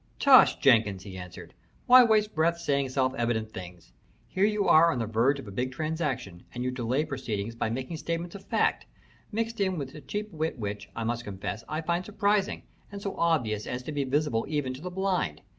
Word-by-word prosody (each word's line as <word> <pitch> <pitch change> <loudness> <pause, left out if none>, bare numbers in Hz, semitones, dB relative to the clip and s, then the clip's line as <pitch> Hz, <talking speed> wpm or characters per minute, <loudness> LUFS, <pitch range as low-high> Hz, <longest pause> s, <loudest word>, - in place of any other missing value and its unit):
"Tush, 270 -3 +7
Jenkins!" 110 -8 +3
he 95 -2 -9
answered. 90 -1 -9 0.3
"Why 255 0 +9
waste 215 -2 +2
breath 165 +2 +2
saying 140 -4 0
self 130 0 +1
evident 115 -3 -1
things? 90 -2 -10 0.3
Here 190 - +1
you 210 -1 +1
are 165 +2 +6
on - - -2
the 115 - -1
verge 115 +6 +2
of 130 - -9
a - - -7
big 125 +6 -2
transaction, 135 - -3
and 125 - -3
you 130 - -1
delay 125 +4 -1
proceedings 115 -7 -4
by 115 -1 -2
making 130 +7 -4
statements 170 +2 -4
of 200 -1 -9
fact, - - 0 0.4
mixed 225 0 -2
in 190 -2 +1
with 135 -3 -5
a 150 - -10
cheap 210 +5 -5
wit 160 -2 -3
which, 105 -2 -5
I 115 - -3
must 120 +1 -2
confess, 100 +2 -5
I 155 +1 -2
find 170 +2 -1
surprising, 205 -1 0 0.3
and 200 - -6
so 200 -1 -4
obvious 125 -11 0
as 125 +1 -4
to 155 - -5
be 145 -1 -1
visible 135 -3 0
even 145 -4 -1
to 130 - -10
the 180 - -5
blind. 180 - -1
140 Hz, 210 wpm, -28 LUFS, 115-170 Hz, 0.4 s, Why